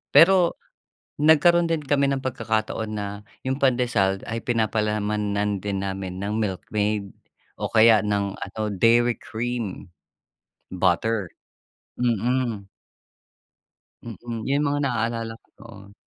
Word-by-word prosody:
Pero 180 0 +6 0.7
nagkaroon 165 +3 +5
din 160 -2 -1
kami 140 0 +2
ng 135 -1 -1
pagkakataon 110 -3 -2
na, 105 -1 -3 0.4
'yong 130 +2 -2
pandesal 120 -7 +1
ay 115 0 -4
pinapalamanan 105 -3 0
din 100 0 -3
namin 95 -1 -4
ng 105 +3 -2
Milkmaid, 105 0 -2 0.5
o - - -1
kaya 110 -1 +6
ng 100 -1 -1
ano 110 - -7
Dairy 115 +4 +3
Cream, 115 -6 -5 0.8
butter. 95 +2 +1 0.7
Mm. 120 -3 0 1.3
Mm, 115 0 -7
'yon 140 +2 +2
mga 145 0 0
naalala 115 -3 -1
ko - - -35
noon. 100 -3 -14
110 Hz, 110 wpm, -24 LUFS, 100-125 Hz, 1.3 s, Pero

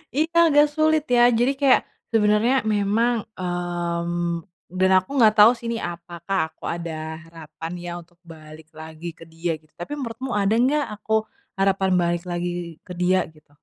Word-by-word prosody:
Iya, 320 +3 0
agak 295 0 +6
sulit 310 -1 +3
ya. 240 - +5 0.2
Jadi 245 +3 +3
kayak, 275 -2 +5 0.3
sebenernya 215 +2 +3 0.2
memang, 210 +4 +1 0.2
mmm, 175 -1 -2 0.4
dan 190 0 +4
aku 185 - -1
nggak 220 -4 +6
tahu 210 +2 +9
sih 235 - -12
ini 230 - -1
apakah 175 +2 -5
aku - - -39
ada 170 0 -4 0.3
harapan 165 0 -9
ya 175 - -5
untuk 170 +1 -23
balik 155 -1 -13
lagi 160 +1 -9
ke 165 - -13
dia 165 0 -2
gitu 155 0 -30
tapi 290 +13 -7
menurutmu 255 -1 -5
ada 200 +2 +2
nggak 290 +3 +2
aku 210 +1 -5 0.4
harapan 195 0 +2
balik 170 0 0
lagi 175 -1 -4
ke 180 - -8
dia 185 +1 +3
gitu? 150 -1 -23
175 Hz, 165 wpm, -23 LUFS, 170-230 Hz, 0.4 s, tahu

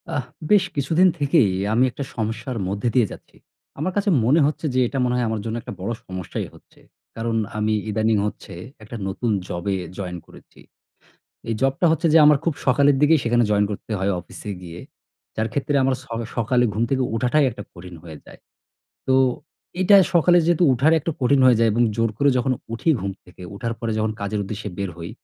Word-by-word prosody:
আহ 130 -4 -2 0.3
বেশ 205 -3 +6
কিছুদিন 160 +7 +3
থেকেই 135 -8 +3 0.2
আমি 120 +3 +3
একটা 140 - -5
সমস্যার 115 +2 -3
মধ্যে 100 +5 -1
দিয়ে 120 -7 +3
যাচ্ছি। - - -13 0.4
আমার 185 +6 -1
কাছে 205 0 +1 0.2
মনে 140 +7 +4
হচ্ছে 150 +2 -2
যে 130 - +1
এটা 135 +2 -3
মনে 125 - 0
হয় 125 -1 0
আমার 110 -2 -2
জন্য 115 0 -3
একটা 120 - -8
বড়ো 100 +6 -3
সমস্যাই 95 -3 -5
হচ্ছে, - - -21 0.4
কারণ 115 0 -2 0.2
আমি 110 0 0 0.2
ইদানিং 110 0 +1
হচ্ছে - - -9 0.3
একটা 110 +2 -9
নতুন 110 +5 -3 0.2
জবে 95 +3 -2 0.2
জয়েন 90 -3 -5
করেছি। - - -18 0.9
এই 115 - 0
জবটা 135 +6 +1
হচ্ছে 165 +1 +1
যে 165 - +8
আমার 150 -1 +6
খুব 165 - 0
সকালের 140 +2 +4
দিকেই 155 0 +5
সেখানে 120 0 +2
জয়েন 105 0 +3
করতে 105 - -7
হয়, 100 +1 0
অফিসে 100 +4 -9
গিয়ে, 85 -1 -9 0.6
যার 110 +1 -1
ক্ষেত্রে 145 0 -1
আমার 130 0 +2
ছ - - -16 0.3
সকালে 120 +2 +2
ঘুম 110 +3 0
থেকে 135 -1 +1
ওঠাটাই 130 +5 +2
একটা 105 -2 -9
কঠিন 90 0 -11
হয়ে 80 -3 -10
যায়। - - -15 0.7
তো 130 - +3 0.7
এটা 200 +2 +6 0.2
সকালে 175 +1 +5
যেহেতু 175 +1 +2
ওঠার 140 +6 +3
একটা 165 - -3
কঠিন 135 +2 +3
হয়ে 125 -3 +6
যায়, 115 -1 +4
এবং 120 - +1
জোর 115 +1 +1
করে 140 +2 +3
যখন 130 +1 +1 0.2
উঠি 115 +8 -1
ঘুম 95 +1 -3
থেকে, 90 +1 -16
ওঠার 115 +3 -3
পরে 115 -1 -2
যখন 110 0 0
কাজের 100 +1 -2
উদ্দেশ্যে 105 +1 -6
বের 100 -1 -2
হই, 85 0 -7
115 Hz, 195 wpm, -22 LUFS, 105-140 Hz, 0.9 s, যে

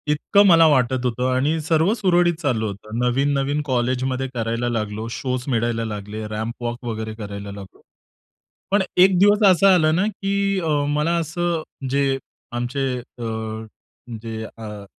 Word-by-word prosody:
इतकं 200 +7 +3
मला 165 -3 +7
वाटत 130 -3 +2
होतं 125 +1 0
आणि 145 +5 +1
सर्व 160 +5 +2
सुरळीत 175 -5 +3
चालू 120 -8 0
होतं. 105 +2 -7
नवीन-नवीन 140 +3 +1
कॉलेजमध्ये 130 0 -1
करायला 115 0 -1
लागलो, 110 -1 -3
शोज 125 0 -3
मिळायला 115 -2 0
लागले, 105 0 -6
रॅम्पवॉक 115 +3 -4
वगैरे 110 -1 -4
करायला 100 -2 -7
लागलो. 100 -1 -11 0.9
पण 205 0 +4 0.2
एक 185 0 +6
दिवस 205 +2 +5
असं 185 +2 +4
आलं 155 -3 +3
ना, 185 +3 +2
की 200 -1 -1
अ, 165 -3 -2 0.2
मला 150 +3 +1
असं 170 +1 -1 0.3
जे 135 0 +1 0.3
आमचे 120 +3 -2
अ, 110 -2 -6 0.6
जे 110 -1 -5
अ, 105 -2 -8
130 Hz, 140 wpm, -22 LUFS, 115-160 Hz, 0.9 s, मला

